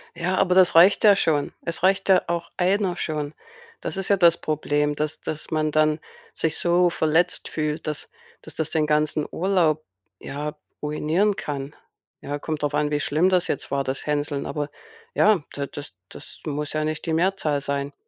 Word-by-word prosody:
Ja, 175 +2 -1
aber 180 0 +3
das 185 -3 +5
reicht 180 +6 +6
ja 205 -2 +8
schon. 150 -6 0
Es 170 +1 -2
reicht 195 +1 +2
ja 190 - +6
auch 170 0 -2
1 185 0 +1
schon. 150 -1 -3 0.5
Das - - -3
ist 195 +1 -3
ja 200 - +4
das 170 -2 +5
Problem, 150 -1 -1
dass 150 +1 -3
dass 155 +1 -5
man 155 -1 0
dann 155 0 +2 0.3
sich 160 0 0
so 175 +1 +3
verletzt 165 +2 +1
fühlt, 155 0 -3
dass 150 -1 -3 0.3
dass - - -8
das 160 -1 -2
den 155 -2 +1
ganzen 150 0 +1
Urlaub, 170 -5 +1 0.4
ja, 150 +2 -5 0.3
ruinieren 160 +7 +1
kann. 140 -3 -5 0.5
Ja, 145 +1 -4
kommt 155 0 -4
drauf 145 - 0
an, 150 0 0
wie 150 - +1
schlimm 155 +6 +2
das 180 -1 +2
jetzt - - -3
war, 140 0 0
das 130 0 -3
Hänseln, 145 -1 -1
aber 150 -1 -3 0.4
ja, 210 -5 +4
da 140 -1 -3
das 145 -6 -8 0.2
das - - -11
muss 150 0 -3
ja 155 0 0
nicht 155 0 -3
die 160 - -1
Mehrzahl 160 -4 +1
sein. 140 0 -2
155 Hz, 185 wpm, -24 LUFS, 150-175 Hz, 0.5 s, ja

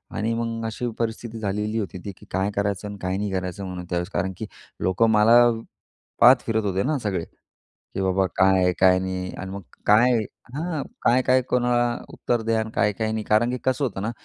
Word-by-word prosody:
आणि 115 +2 -1
मग 115 0 -3
अशी 115 +2 -3
परिस्थिती 115 0 -3
झालेली 105 +1 -2
होती 95 -2 -4
ती, 100 - -4
की - - -16
काय 95 +2 0
करायचं 100 0 -1
आणि 100 - -7
काय 95 +1 -1
नाही 100 -1 -2
करायचं 95 +1 -3
म्हणून 90 -1 -6
त्यावेळेस. 90 +1 -2
कारण, 95 +1 -1
की - - -5 0.4
लोकं 110 +5 +2
मला 110 +3 +6 0.8
पाहत 125 +1 +8
फिरत 110 -1 0
होते 95 0 0
ना, 150 +2 0
सगळे, 95 -5 -1 0.5
की 95 - -8
बाबा 95 0 +2
काय 95 0 +4
आहे, 90 0 +3
काय 95 -1 +5
नाही 95 0 -4
आणि 95 +1 -6
मग 100 - -6 0.2
काय 120 +4 +5 0.4
हां, 160 -1 -2 0.2
काय-काय 130 +1 +3
कोणाला 120 -1 +1 0.2
उत्तर 120 -1 -1
द्या 115 0 +1
आणि 110 - -3
काय-काय 105 +2 +1
नाही. 110 -1 -2
कारण, 110 +3 +3
की 125 - -2
कसं 130 +2 0
होतं 95 -6 -4
ना, 115 - -2
105 Hz, 200 wpm, -24 LUFS, 95-115 Hz, 0.8 s, पाहत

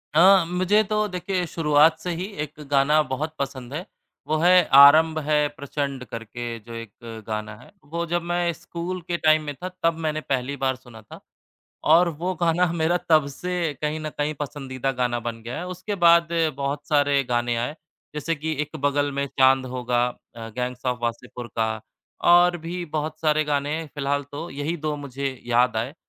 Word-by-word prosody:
हाँ, 185 +2 +7
मुझे 185 +5 +2
तो 215 0 0
देखिए 180 0 -2
शुरुआत 155 0 +3
से 180 - -5
ही 180 +3 -3 0.2
1 150 0 -10
गाना 145 +2 +4
बहुत 145 +4 -4
पसंद 135 -2 -5
है, 170 +5 -4 0.4
वो 155 - +1
है 180 +3 +6 0.2
"आरंभ 155 +3 +8
है 150 -1 +3
प्रचंड" 140 -2 -4
करके 115 +1 -6
जो 115 +2 -12
एक 115 0 -9
गाना 110 -1 -4
है। - - -17 0.2
वो 170 +1 -2
जब 175 +1 0
मैं 175 0 0
स्कूल 175 +3 -6
के 175 - -1
टाइम 155 -1 +3
में 145 -1 -4
था 180 +6 -6
तब 165 -1 +2
मैंने 155 0 -1
पहली 135 -1 -2
बार 130 -1 0
सुना 120 -3 -14
था 105 - -13 0.8
और 175 +1 +5
वो 170 +3 -3
गाना 170 +1 +3
मेरा 170 +1 +1
तब 155 -3 +5
से 180 -3 -2
कहीं 150 +1 -1
न 155 0 -4
कहीं 150 +1 0
पसंदीदा 135 -2 -3
गाना 125 -1 -1
बन 115 -1 -5
गया 120 +2 -5
है। 180 - -5
उसके 185 +3 -5
बाद 170 0 +6 0.3
बहुत 140 +1 -3
सारे 145 -2 +3
गाने 120 -1 0
आए 120 +6 -3 0.4
जैसे 150 +2 -1
कि 160 +1 -3
"एक 150 +1 -7
बगल 145 0 +1
में 140 0 -1
चाँद 130 -1 +3
होगा", 125 -1 0 0.3
अ, 115 -1 -7
गैंग्स 125 0 -4
ऑफ 125 -1 0
वासेपुर 120 +1 -4
का, 110 -1 0 0.4
और 175 0 +5
भी 175 +2 -5
बहुत 155 0 -4
सारे 155 -1 +2
गाने 150 +2 -1
फिलहाल 145 0 -1
तो 155 +4 -5
यही 145 +5 -3
2 155 -1 -3
मुझे 135 -2 -5
याद 120 0 +2
आए। 120 +6 -2
145 Hz, 185 wpm, -24 LUFS, 130-165 Hz, 0.8 s, आरंभ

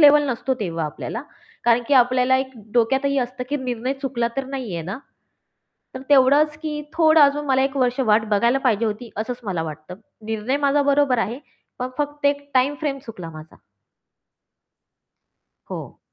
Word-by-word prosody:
Level 295 -1 +7
नसतो. 255 +2 -1
तेव्हा 165 -5 -2
आपल्याला 190 - -5 0.4
कारण 240 0 +4
की 285 - +4
आपल्याला 255 0 +4
एक 265 0 -3 0.2
डोक्यातही 265 +4 +2
असतं 250 0 -3
की 290 - 0
निर्णय 255 -1 -2
चुकला 240 -3 -1
तर 270 - -1
नाहीये 250 -11 -4
ना. 190 +8 -5 1.0
तर 260 - -6
तेवढंच 290 +2 +5
की 300 -1 -3
थोडं 320 -1 +5
अजून 290 +1 +4
मला 265 -1 +3
1 270 +1 -1
वर्ष 250 0 +1
वाट 220 -3 +3
बघायला 235 +5 +3
पाहिजे 235 -5 +1
होती 220 +2 -4
असंच 240 +4 -4
मला 185 -5 -2
वाटतं. 155 +2 -7 0.3
निर्णय 225 +4 -1
माझा 285 +1 +3
बरोबर 280 -3 +3
आहे 225 +3 -1 0.4
पण 250 - -2
फक्त 290 0 -1
एक 285 0 -1
टाईम 260 +3 +3
फ्रेम 285 -3 -2
चुकला 180 -7 -8
माझा. 155 0 -12 2.1
हो. - - -7
255 Hz, 160 wpm, -22 LUFS, 225-280 Hz, 2.1 s, Level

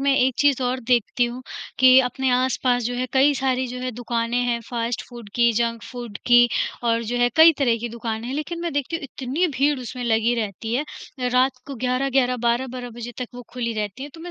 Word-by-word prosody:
मैं 275 0 +3
एक 255 -1 +3
चीज़ 280 -3 +3
और 255 +1 -1
देखती 245 0 +2
हूँ 245 +2 -5 0.4
कि 260 0 +8
अपने 260 +1 -1
आस-पास 250 0 +1
जो 245 - -2
है 255 +1 -2
कई 275 +2 +5
सारी 260 -1 0
जो 250 +1 -6
है 255 0 -2
दुकानें 235 0 -2
हैं 240 -1 0
फास्ट 235 -1 -2
फूड 240 -4 -10
की, 235 0 +4
जंक 230 0 -1
फूड 240 -4 -8
की 240 0 +6 0.4
और 230 0 +2
जो 240 +2 -2
है 245 0 +4
कई 325 +1 +9
तरह 240 -5 +2
की 240 - -4
दुकानें 230 0 -5
हैं 265 - -3
लेकिन 335 +3 -4
मैं 340 -1 -3
देखती 285 +3 -1
हूँ 330 - -10
इतनी 275 +6 -1
भीड़ 285 +1 +2
उसमें 250 +1 -6
लगी 230 +1 +2
रहती 225 +1 -3
है, 285 +4 0 0.4
रात 255 +1 +2
को 275 - -6
11-11 255 +1 +1
12-12 245 +1 -1
बजे 240 +1 -8
तक 250 - -4
वो 245 - -8
खुली 235 -2 -2
रहतीं 215 +4 -4
हैं। 290 - -9
तो 325 - -11
मैं 350 - -7
245 Hz, 220 wpm, -23 LUFS, 235-265 Hz, 0.4 s, कई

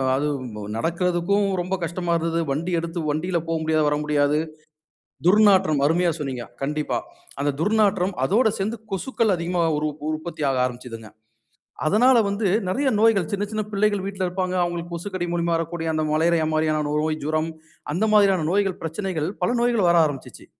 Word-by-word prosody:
அது 145 +3 0
உம் 125 -2 -7
ப 105 - -6
நடக்கிறதுக்கும் 175 - +1 0.2
ரொம்ப 185 +2 -2
கஷ்டமா 170 +1 -2
இருந்தது. 165 0 -1
வண்டி 170 +6 -2
எடுத்து 170 +1 -4
வண்டில 170 +3 -1
போமுடியாது, 160 -1 +1
வர 150 - 0
முடியாது. 150 0 +2 0.9
துர்நாற்றம் 190 -8 +5
அருமையா 175 +2 +2
சொன்னீங்க 130 -5 -4 0.2
கண்டிப்பா. 150 +1 -1 0.4
அந்த 145 - +1
துர்நாற்றம். 200 -2 +2
அதோட 220 - +3
சேந்து 215 +4 -2
கொசுக்கள் 210 +1 0
அதிகமா 175 +1 -1 0.2
உரு 155 0 0 0.2
உற்பத்தி 155 0 -5
ஆக 130 - -1
ஆரம்பிச்சதுங்க. 120 -3 -7 0.8
அதனால 240 +8 +5
வந்து, 200 +1 -1 0.2
நெறைய 265 +8 0
நோய்கள் 215 -7 +3
சின்ன 200 0 0
சின்ன 215 -1 -1
பிள்ளைகள் 205 -1 +1
வீட்ல 195 -1 -4
இருப்பாங்க. 185 0 -2
அவுங்களுக்கு 175 0 -3
கொசுக்கடி 180 +1 -4
மூலமா 170 0 0
வரக்கூடிய 165 0 -3
அந்த 155 0 0
மலேரியா 160 0 +2
மாரியான 155 -1 +1
நோய், 155 +1 0
ஜுரம் 155 +2 -1 0.4
அந்த 190 +6 +1
மாதிரியான 195 -6 +4
நோய்கள், 195 -2 +1
பிரச்சனைகள் 165 -2 -2
பல 180 - +2
நோய்கள் 235 -6 +2
வர 170 - +4
ஆரம்பிச்சிச்சி. 140 -3 -8
170 Hz, 155 wpm, -23 LUFS, 155-195 Hz, 0.9 s, துர்நாற்றம்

